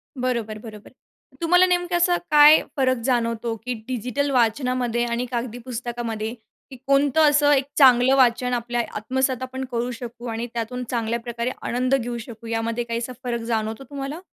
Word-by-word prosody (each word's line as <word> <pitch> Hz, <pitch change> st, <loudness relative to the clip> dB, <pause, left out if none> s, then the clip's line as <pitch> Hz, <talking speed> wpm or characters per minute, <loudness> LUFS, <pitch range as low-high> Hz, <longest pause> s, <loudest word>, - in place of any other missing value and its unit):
बरोबर, 235 Hz, -4 st, -2 dB
बरोबर. 215 Hz, -2 st, -11 dB, 0.5 s
तुम्हाला 360 Hz, +2 st, +5 dB
नेमकं 355 Hz, -1 st, +1 dB
असं 350 Hz, 0 st, +3 dB, 0.2 s
काय 300 Hz, +1 st, +8 dB, 0.2 s
फरक 255 Hz, -1 st, +2 dB
जाणवतो, 230 Hz, -2 st, 0 dB
की 250 Hz, -, -1 dB
डिजिटल 250 Hz, +3 st, -2 dB
वाचनामध्ये 245 Hz, 0 st, +1 dB
आणि 235 Hz, +1 st, -2 dB
कागदी 240 Hz, -1 st, -3 dB
पुस्तकामध्ये, 235 Hz, -3 st, -4 dB, 0.4 s
की -, -, -8 dB
कोणतं 285 Hz, +2 st, +4 dB
असं 290 Hz, 0 st, +4 dB
एक 270 Hz, -2 st, +2 dB
चांगलं 260 Hz, -1 st, +6 dB
वाचन 250 Hz, -1 st, +3 dB
आपल्या 240 Hz, 0 st, -1 dB
आत्मसात 260 Hz, +3 st, -1 dB
आपण 260 Hz, +1 st, -5 dB
करू 240 Hz, +1 st, -2 dB
शकू 240 Hz, 0 st, -8 dB
आणि 230 Hz, +1 st, -3 dB
त्यातून 240 Hz, +2 st, -4 dB
चांगल्या 235 Hz, -1 st, -1 dB
प्रकारे 235 Hz, +1 st, -3 dB
आनंद 255 Hz, +2 st, 0 dB
घेऊ 240 Hz, -2 st, -3 dB
शकू? 230 Hz, 0 st, -10 dB
यामध्ये 230 Hz, +1 st, -2 dB
काही 235 Hz, 0 st, -3 dB
असा 240 Hz, +2 st, -5 dB
फरक 240 Hz, -1 st, -2 dB
जाणवतो 220 Hz, +2 st, -2 dB
तुम्हाला? 280 Hz, +2 st, -5 dB
245 Hz, 160 wpm, -23 LUFS, 235-265 Hz, 0.5 s, काय